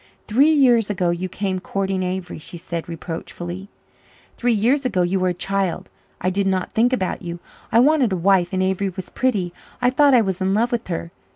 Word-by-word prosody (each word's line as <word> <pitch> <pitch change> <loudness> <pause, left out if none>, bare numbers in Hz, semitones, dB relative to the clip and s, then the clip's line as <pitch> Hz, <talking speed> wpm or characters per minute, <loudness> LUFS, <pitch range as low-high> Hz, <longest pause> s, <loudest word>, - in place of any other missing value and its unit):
"Three 265 +8 +4
years 245 -8 +4
ago 185 -4 +1
you 180 +2 -3
came 190 0 -2
courting 195 0 -2
Avery," 180 -2 -4
she 175 - -8
said 170 0 -5
reproachfully. 175 +3 -6 0.7
"Three 245 0 +1
years 240 +6 +2
ago 200 -8 +1
you 185 +2 0
were 185 - +1
a - - 0
child. 195 -1 -2 0.3
I 185 - 0
did 195 +1 0
not 190 -1 -1
think 235 +3 +3
about 190 -8 -1
you. 170 -1 -5 0.3
I 230 - +5
wanted 280 -4 +3
a 190 - 0
wife 180 0 +3
and 185 -1 0
Avery 190 +1 0
was 185 0 -8
pretty. 200 -9 0 0.3
I 245 0 +3
thought 280 0 +5
I 240 - +6
was 190 -4 -2
in 190 +1 +1
love 235 +3 +1
with 240 -1 -2
her. 170 -1 -4
190 Hz, 205 wpm, -21 LUFS, 180-230 Hz, 0.7 s, I